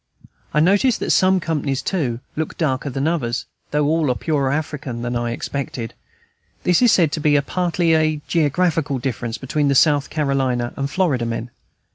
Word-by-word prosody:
I 150 - +2
notice 200 +9 +3
that - - -2
some 190 0 +4
companies, 150 -5 -2
too, 130 -11 -1
look 160 0 -3
darker 140 -3 -1
than 135 +3 -1
others, 125 -8 -1 0.2
though 150 0 +1
all 155 -1 +1
are 125 - +1
purer 140 -3 0
African 140 -5 -3
than 120 0 -2
I 120 0 -1
expected. 120 -1 -4 0.7
This 180 +4 +3
is 245 -3 +6
said 165 -5 +3
to 155 - -2
be 145 -1 +3
partly 175 +2 0
a 155 -1 +2
geographical 160 -2 +1
difference 120 -2 -3
between 145 +2 -1
the 140 - +2
South 145 0 +4
Carolina 135 -5 0
and 140 0 -2
Florida 140 -9 0
men. 115 +1 -4
145 Hz, 170 wpm, -21 LUFS, 130-160 Hz, 0.7 s, is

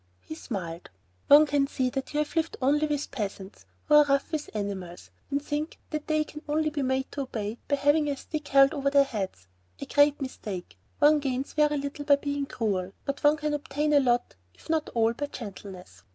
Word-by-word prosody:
He - - -8
smiled. 180 - -6 0.4
"One 295 +2 +8
can 285 -1 +1
see 255 -2 -1
that 270 0 -4
you 295 - -3
have 300 +2 -1
lived 325 0 0
only 295 +3 +2
with 295 -1 -2
peasants 205 -5 -6 0.2
who 300 - +1
are 300 0 +8
rough 275 -1 +1
with 305 -2 -3
animals, 190 -4 -5 0.2
and 280 0 0
think 295 +2 -4
that 305 -1 -4
they 310 -1 +2
can 300 0 -10
only 305 +1 +1
be 295 -1 -2
made 260 0 -1
to 285 - -4
obey 225 -4 -4
by 285 - +2
having 290 +2 +2
a 280 - -2
stick 300 0 -6
held 275 +2 +5
over 280 -2 0
their 280 0 +5
heads. 195 - -5 0.3
A - - -5
great 290 0 +3
mistake. 210 -9 -6 0.2
One 300 +1 +5
gains 270 -1 -3
very 300 -1 +2
little 285 +1 -5
by 285 - +6
being 285 0 -3
cruel, 195 -7 -2
but 275 0 -4
one 295 +1 +5
can 300 -1 -2
obtain 295 +1 -1
a 290 - +7
lot, 245 -2 +1 0.2
if - - -8
not 315 -2 0
all, 225 0 +3
by 290 +5 -4
gentleness. 190 - -9
280 Hz, 210 wpm, -27 LUFS, 235-295 Hz, 0.4 s, One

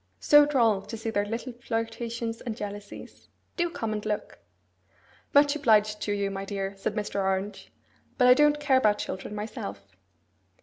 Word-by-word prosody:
'So 295 0 +6
droll 230 -8 +3
to 225 - -8
see 225 +1 -4
their 205 -1 0
little 230 +3 -4
flirtations 230 0 -4
and 230 -3 -5
jealousies! 205 0 -8 0.3
Do 345 -1 0
come 225 -10 -3
and 210 -1 -4
look!' 210 - -4 0.9
'Much 285 +1 +5
obliged 215 -7 +3
to 205 - -2
you, 200 -1 -1
my 195 0 -4
dear,' 195 0 -4
said 195 +2 -3
Mr. 210 -2 -2
Orange; 195 +1 -2 0.5
'but 250 - +5
I 250 - +9
don't 295 +2 +4
care 290 -3 +3
about 210 -5 +3
children 200 +2 -5
myself. 100 - -7
215 Hz, 165 wpm, -27 LUFS, 205-245 Hz, 0.9 s, I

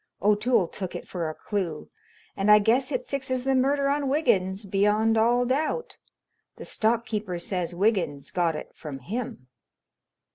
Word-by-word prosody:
O'Toole 210 -1 +3
took 185 +1 -6
it - - -7
for 170 -3 -3
a 155 - -6
clue 180 -7 -4 0.4
and 195 +1 0
I 210 - +9
guess 240 +6 +2
it - - -2
fixes 260 -2 -2
the 270 0 +1
murder 275 +2 +2
on 280 -1 0
Wiggins 200 -9 +1
beyond 210 +3 +2
all 240 +2 +3
doubt. 305 - -1 0.6
The - - -9
stock 230 +1 +1
keeper 210 -6 -3
says 175 0 -3
Wiggins 175 -8 0
got 170 -3 +1
it - - -7
from 150 -4 -7
him." 180 - -6
210 Hz, 155 wpm, -26 LUFS, 180-255 Hz, 0.6 s, I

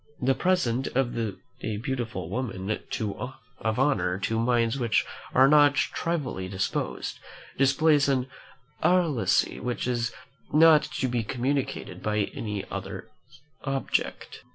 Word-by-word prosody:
The 130 +1 +3
presence 135 -8 +1
of 125 -2 +1
a 110 -1 -4
beautiful 115 - -3
woman 100 -2 -3 0.9
of 110 +1 -1
honour, 95 -11 +2
to 110 +3 -1
minds 120 +1 +2
which 120 -3 +2 0.3
are 130 +1 +7
not 145 0 +6
trivially 140 - -1
disposed, 95 0 -3 0.4
displays 145 +2 +4
an 130 -2 +2 0.6
alacrity 170 -9 +2
which 125 -1 -3
is 120 -1 0 0.4
not 155 0 +7
to 130 - -2
be 120 -2 -1
communicated 130 +4 -2
by 105 -1 0
any 105 -3 -4
other - - -6 0.5
object. 135 0 -2
125 Hz, 115 wpm, -27 LUFS, 110-140 Hz, 0.9 s, are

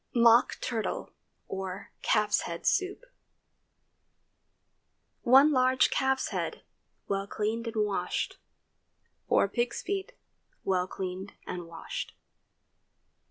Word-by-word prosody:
MOCK 235 0 +6
TURTLE 230 -4 -3 0.3
OR 190 0 -5
CALF'S 210 0 +3
HEAD 170 0 -6
SOUP. 395 -1 +2
✠ - - -35 2.2
1 270 +5 +7
large 255 -1 +4
calf's 265 0 +1
head, - - -3 0.4
well 195 0 -1
cleaned 220 +3 -2
and 220 -2 +1
washed. 205 -2 -2 0.9
4 - - +4
pig's 240 +4 -1
feet, 395 +5 -3 0.5
well 185 -1 +1
cleaned 190 +1 -5
and 175 -2 -5
washed. 165 -1 -6
220 Hz, 100 wpm, -29 LUFS, 195-260 Hz, 2.2 s, 1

